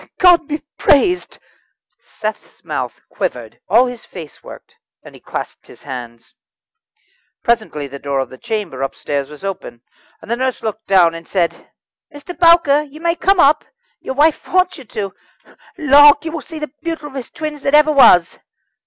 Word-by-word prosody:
"God 350 -4 +5
be 300 0 -4 0.2
praised!" 360 +6 +2 0.6
Seth's 215 0 -7
mouth - - -4
quivered, - - -5
all 245 - +5
his 245 -2 -7
face 160 -6 -11
worked, - - -13 0.3
and - - -13
he - - -16
clasped - - -7
his - - -16
hands. 120 -4 -9 1.1
Presently 215 -11 -1
the 140 0 -9
door 140 -1 -3
of 135 - -2
the 130 - -11
chamber 210 - -4
upstairs 140 +1 -3
was 150 +4 -13
opened, 190 -11 -6 0.4
the 235 - -3
nurse 260 +1 -2
looked 220 0 -5
down, 180 -4 +4
and 165 0 -10
said: 175 -3 -2 0.4
"Mr. 290 +4 -10
Bowker, 335 -4 +5
you 300 0 -12
may 335 0 +1
come 385 +2 +2
up. 300 0 +5 0.4
Your 265 - -6
wife 300 +2 +2
wants 370 -1 +1
you. 205 -6 -6 0.6
Lawk! 290 0 +6
you 320 - -3
will 325 -1 -5
see 320 - -10
the 300 -3 -6
beautifullest 295 -6 -6
twins 305 -2 -5
that 280 +2 +2
ever 300 +1 +5
was." 180 - +5
265 Hz, 160 wpm, -17 LUFS, -, 1.1 s, Lawk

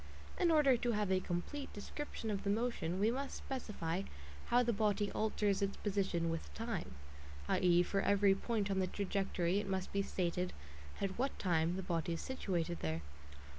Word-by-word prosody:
In 355 -2 +4
order 295 -6 +5
to 240 0 0
have 210 -2 0
a 190 - +4
complete 185 +11 -3
description 225 +1 -5
of 200 -1 -2
the 200 - 0
motion, 205 -5 0
we 215 +3 +4
must 275 +2 -3
specify 195 -9 -3 0.5
how 245 +1 +4
the 235 0 +1
body 205 -1 +1
alters 210 -2 +1
its 200 0 0
position 190 -5 0
with 165 - -4
time; 65 -2 -3 0.5
i.e. 175 -1 +4
for 195 +2 0
every 200 -1 +5
point 205 0 -1
on 190 - +1
the 185 - +2
trajectory 195 -2 0
it 205 -1 -4
must 190 -1 -2
be 200 - +2
stated 180 -1 -1 0.5
at 195 +2 -2
what 270 +2 0
time 170 -2 +2
the 190 - -3
body 170 -1 -1
is 165 - -3
situated 175 -9 -2
there. 80 0 -2
195 Hz, 175 wpm, -36 LUFS, 175-220 Hz, 0.5 s, order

